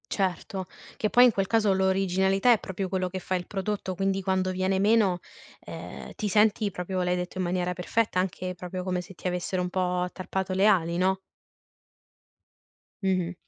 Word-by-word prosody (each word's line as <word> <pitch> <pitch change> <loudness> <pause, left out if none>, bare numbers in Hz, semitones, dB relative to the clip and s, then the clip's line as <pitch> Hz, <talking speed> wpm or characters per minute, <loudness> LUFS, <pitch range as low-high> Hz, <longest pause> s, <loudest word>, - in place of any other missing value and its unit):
Certo, 190 -1 -2 0.3
che 215 - 0
poi 245 - +6
in 250 - +7
quel 195 -2 -1
caso 215 -1 +3
l'originalità 190 +2 +3
è 230 - +5
proprio 190 0 -4
quello 185 -1 0
che 185 +1 -5
fa 185 - -2
il 180 -1 -3
prodotto, 195 -1 -3
quindi 195 +1 0
quando 185 0 0
viene 185 +1 0
meno 200 -2 +3 0.4
eh - - -8
ti 215 - -1
senti 210 +1 +3
proprio, 185 0 -3
l'hai 180 0 +1
detto 180 +1 -4
in 185 - 0
maniera 180 0 0
perfetta, 180 +3 0
anche 185 0 -2
proprio 180 +1 -6
come 180 -1 -1
se 180 +2 -9
ti 180 - -19
avessero 180 +1 -2
un 180 - -2
po' 180 -1 0
tarpato 190 0 -3
le 190 +2 +3
ali, 170 -5 +3
no? 190 +1 +2 1.9
Mh-mh. 185 -2 +1
190 Hz, 180 wpm, -27 LUFS, 180-195 Hz, 1.9 s, in